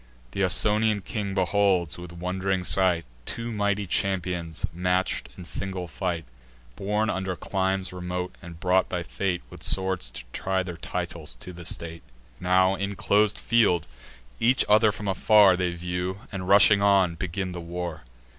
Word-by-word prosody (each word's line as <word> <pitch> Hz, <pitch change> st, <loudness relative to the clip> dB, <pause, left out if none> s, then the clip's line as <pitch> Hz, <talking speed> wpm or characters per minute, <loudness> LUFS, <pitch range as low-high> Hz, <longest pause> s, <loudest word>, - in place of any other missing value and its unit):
Th' -, -, -10 dB
Ausonian 105 Hz, +3 st, +2 dB
king 100 Hz, 0 st, -4 dB
beholds, 95 Hz, -3 st, +2 dB
with 90 Hz, -1 st, -9 dB
wond'ring 90 Hz, +2 st, -2 dB
sight, 90 Hz, -2 st, +3 dB, 0.2 s
Two 115 Hz, 0 st, -4 dB
mighty 100 Hz, -1 st, 0 dB
champions 90 Hz, -3 st, -1 dB
match'd 90 Hz, +2 st, 0 dB
in 90 Hz, -, -9 dB
single 95 Hz, 0 st, -3 dB
fight, 85 Hz, -1 st, -3 dB, 0.5 s
Born 105 Hz, +2 st, 0 dB
under 95 Hz, -3 st, -2 dB
climes 95 Hz, 0 st, -2 dB
remote, 90 Hz, 0 st, -4 dB
and 85 Hz, -1 st, -10 dB
brought 90 Hz, +1 st, +2 dB
by 90 Hz, -2 st, -2 dB
fate, 90 Hz, +1 st, -2 dB
With -, -, -11 dB
swords 95 Hz, -9 st, +2 dB
to -, -, -8 dB
try 95 Hz, 0 st, -1 dB
their 90 Hz, -2 st, -7 dB
titles 75 Hz, -5 st, -5 dB
to 90 Hz, +9 st, -10 dB
the 85 Hz, 0 st, -10 dB
state. 85 Hz, 0 st, -3 dB, 0.4 s
Now, 95 Hz, +1 st, +3 dB
in 100 Hz, +1 st, -3 dB
clos'd 105 Hz, +1 st, +2 dB
field, 100 Hz, -8 st, +2 dB, 0.5 s
each 125 Hz, +3 st, +3 dB
other 105 Hz, +1 st, +5 dB
from 105 Hz, 0 st, -6 dB
afar 100 Hz, 0 st, +5 dB
They 90 Hz, -1 st, 0 dB
view; 90 Hz, +2 st, -4 dB
and, 95 Hz, -2 st, -5 dB
rushing 100 Hz, 0 st, +6 dB
on, 100 Hz, -3 st, +4 dB
begin 95 Hz, +2 st, -3 dB
the 90 Hz, -1 st, -6 dB
war. 85 Hz, -2 st, -5 dB
95 Hz, 155 wpm, -26 LUFS, 90-100 Hz, 0.5 s, rushing